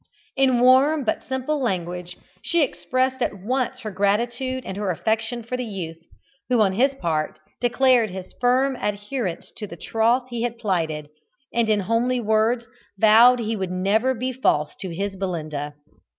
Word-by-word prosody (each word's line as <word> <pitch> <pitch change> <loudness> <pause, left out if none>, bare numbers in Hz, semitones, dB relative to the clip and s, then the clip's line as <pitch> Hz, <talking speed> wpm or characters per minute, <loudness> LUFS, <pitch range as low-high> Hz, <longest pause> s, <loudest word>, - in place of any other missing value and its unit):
In 260 -3 +3
warm 270 +4 +5
but 220 - -1
simple 265 +3 -2
language 180 -5 -3 0.2
she 340 -2 +2
expressed 260 -1 -1
at 235 - 0
once 255 +5 -2
her 215 - -5
gratitude 240 +6 0
and 190 - -5
her 205 -1 -2
affection 225 +6 -1
for 235 +3 -4
the 250 - -3
youth, 180 -7 -6 0.5
who, 250 -2 +3
on 200 -3 +3
his 265 +7 +2
part, 160 - -2 0.2
declared 245 -2 +3
his 185 0 -8
firm 255 +2 +3
adherence 205 -2 -3
to 210 - -5
the 170 - -10
troth 230 +7 +1
he 240 -2 -4
had 235 -1 -2
plighted, 160 -8 -2 0.4
and 235 -2 +1
in 210 -1 +3
homely 235 +5 +1
words 220 +2 +1 0.3
vowed 225 +4 +7
that 235 - -3
he 225 +1 -1
would 190 -3 -3
never 205 +8 +1
be 255 +2 -3
false 150 - +1
to 190 - -6
his 195 +4 -3
Belinda. 155 -6 -4
225 Hz, 165 wpm, -23 LUFS, 190-255 Hz, 0.5 s, vowed